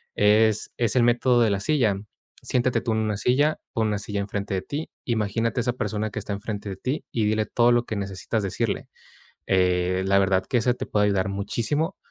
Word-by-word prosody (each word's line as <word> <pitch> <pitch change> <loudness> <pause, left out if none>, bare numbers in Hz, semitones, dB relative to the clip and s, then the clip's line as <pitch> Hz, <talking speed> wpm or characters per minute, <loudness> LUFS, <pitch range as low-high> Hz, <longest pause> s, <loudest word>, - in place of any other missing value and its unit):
Es 105 +1 +3
es 115 -4 +1
el 125 - +5
método 120 +1 +3
de 115 - +4
la 100 -1 0
silla. 120 -5 +2 0.5
Siéntate 125 0 +1
tú 120 - -2
en 110 - +1
una 110 -2 -1
silla, 145 +8 +2
pon 110 -1 +1
una 105 -1 0
silla 105 0 -3
en 100 - -2
frente 100 0 -3
de 95 - 0
ti, 145 +10 -5
imagínate 115 +1 0
esa 125 +1 0
persona 110 -3 -2
que - - -4
está 105 -1 -4
en 100 - -5
frente 105 -1 -5
de 95 - -4
ti 130 +10 -3
y 110 -3 0
dile 110 0 +1
todo 120 +2 +3
lo 120 0 +2
que 110 - -4
necesitas 100 +2 -3
decirle, 95 - -2 0.6
eh, 90 0 +2
la 100 0 +4
verdad 95 -1 +2
que 125 - +1
eso 120 +2 +2
te - - -5
puede 105 -1 +2
ayudar 100 -1 +1
muchísimo. 120 - -1
110 Hz, 220 wpm, -25 LUFS, 100-120 Hz, 0.6 s, el